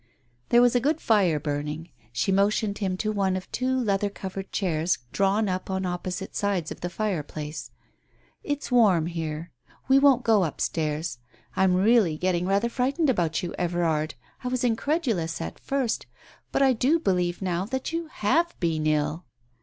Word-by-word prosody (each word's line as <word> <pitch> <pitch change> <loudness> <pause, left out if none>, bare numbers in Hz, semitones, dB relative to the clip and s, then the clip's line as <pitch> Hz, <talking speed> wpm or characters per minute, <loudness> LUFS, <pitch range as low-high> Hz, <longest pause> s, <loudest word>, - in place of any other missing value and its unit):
There 240 +1 +6
was 245 - +4
a - - +5
good 300 +6 +1
fire 190 - +3
burning, 150 +3 -4 0.2
she 120 +10 0
motioned 200 +1 +1
him 190 -3 -1
to 215 +2 -1
one 195 -3 +1
of 185 - -9
two 260 +1 0
leather 205 -3 +1
covered 195 -1 -7
chairs 170 -3 0
drawn 200 +2 +2
up 185 0 -3
on 190 0 -1
opposite 180 +1 -4
sides 195 -6 -1
of - - -8
the 175 - -2
fireplace. 155 -6 -4 0.7
"It's 290 -2 -3
warm 205 -10 +5
here. 165 -1 -4 0.4
We 265 +1 +6
won't 275 -3 +5
go 220 -4 +4
upstairs. 155 -3 -2 0.4
I - - +2
am 180 -1 +3
really 195 -4 +4
getting 180 0 0
rather, 200 +4 +2
frightened 270 +5 +1
about 175 -5 0
you, 175 - -4
Everard. 165 -3 0 0.3
I - - -2
was 255 0 -1
incredulous 235 - 0
at 80 - -6
first, 270 -4 -1 0.4
but - - +2
I 265 -1 +5
do 260 +7 +3
believe 180 - 0
now, 180 -1 -1
that 260 +7 -3
you 335 0 -2
have 325 +7 0
been 160 -3 0
ill." 155 +2 0
190 Hz, 170 wpm, -26 LUFS, 170-235 Hz, 0.7 s, There